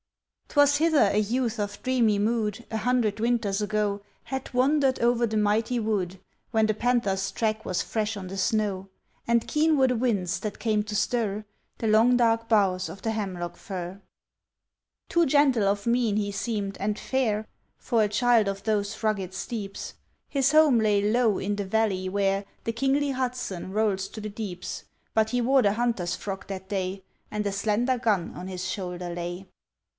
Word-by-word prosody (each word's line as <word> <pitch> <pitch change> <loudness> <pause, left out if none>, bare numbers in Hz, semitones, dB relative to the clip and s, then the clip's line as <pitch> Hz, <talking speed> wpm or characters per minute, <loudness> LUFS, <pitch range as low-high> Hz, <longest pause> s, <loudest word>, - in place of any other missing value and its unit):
'Twas 285 -1 +4
hither 310 -9 +4
a - - +1
youth 230 +2 -1
of 205 0 -3
dreamy 240 -5 +2
mood, 220 +1 -1
A 220 - -1
hundred 230 -3 +1
winters 225 -4 +1
ago, 210 -1 0 0.2
Had 265 -1 -5
wandered 270 +1 +3
over 240 0 +3
the 215 0 -2
mighty 220 +3 +1
wood, 195 -5 -1 0.3
When 220 -1 +2
the 215 - +1
panther's 205 -4 0
track 220 -1 -1
was 180 - -1
fresh 220 -1 -2
on 190 -2 -6
the 190 - -6
snow, 200 -2 0 0.4
And 235 -1 +2
keen 310 0 +2
were 265 -1 +5
the 250 - +1
winds 215 -7 0
that 210 -2 -5
came 215 -2 +1
to 210 0 -5
stir 215 -1 0 0.3
The 225 - -2
long 225 +3 +5
dark 230 -1 +2
boughs 190 -4 +2
of 195 - -10
the 225 - 0
hemlock 185 -5 -4
fir. 185 0 -6 1.1
Too 340 -1 +3
gentle 270 -6 +4
of 200 0 0
mien 235 -3 +2
he 205 -1 -1
seemed 200 -2 -3
and 210 +1 0
fair, 220 -5 0 0.3
For 230 -2 +1
a 210 - +1
child 230 0 +3
of 195 0 -3
those 210 -2 -1
rugged 195 -4 -1
steeps; 200 -2 -5 0.3
His 275 -1 +2
home 305 -6 +6
lay 210 -2 +3
low 230 -3 +3
in 205 +1 -1
the 200 -1 -3
valley 190 -2 0
where 195 0 +1 0.2
The 230 - -1
kingly 275 +4 +1
Hudson 250 -8 -3
rolls 200 -2 0
to - - -9
the 215 0 -5
deeps; 200 -4 -6 0.3
But 220 0 +2
he 245 +1 0
wore 265 +3 +4
the 200 -3 +3
hunter's 225 -6 -1
frock 195 -1 -6
that 190 -1 -6
day, 190 -1 -3 0.3
And 210 0 -3
a 200 - 0
slender 220 +5 0
gun 210 -8 0
on 180 - -7
his 185 0 -4
shoulder 180 -2 -4
lay. 175 +2 -5
215 Hz, 180 wpm, -26 LUFS, 195-240 Hz, 1.1 s, home